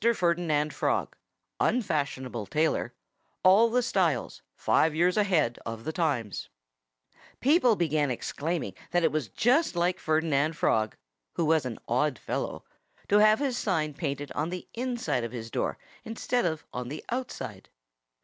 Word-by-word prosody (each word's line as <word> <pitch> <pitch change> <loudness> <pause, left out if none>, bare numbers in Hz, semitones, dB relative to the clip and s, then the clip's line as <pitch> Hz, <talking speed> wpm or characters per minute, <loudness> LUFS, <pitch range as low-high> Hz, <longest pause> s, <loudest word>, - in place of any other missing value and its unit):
FERDINAND 170 -4 +1
FROG - - -1 0.4
UNFASHIONABLE 140 - -1
TAILOR 155 +8 0 0.5
ALL 200 +5 +6
THE 250 +2 +2
STYLES 185 - 0
FIVE 160 -1 +2
YEARS 175 +3 +3
AHEAD 175 - +2
OF 115 0 -6
THE 160 - -2
TIMES 140 - -1 0.9
People 255 -4 +4
began 155 -5 +1
exclaiming 155 +6 -3 0.2
that 175 - +2
that 160 - +3
was 155 -6 -1
just 245 - +2
like 175 +2 +1
Ferdinand 155 -1 +1
Frog 110 -7 +1 0.4
who 165 - +1
was 155 -3 +3
an 115 - -5
odd 130 +2 +1
fellow - - -4 0.4
to 205 - +5
have 215 +1 +6
his 265 -4 -1
sign 155 -7 0
painted 145 -1 -4
on 155 +3 -1
the 180 0 -6
inside 240 - -1
of 115 - -5
his 115 -2 -6
door - - -1 0.3
instead 230 +1 -1
of 160 -1 -3
on 125 0 -4
the 150 +3 -7
outside. 250 +1 -5
160 Hz, 145 wpm, -28 LUFS, 140-200 Hz, 0.9 s, ALL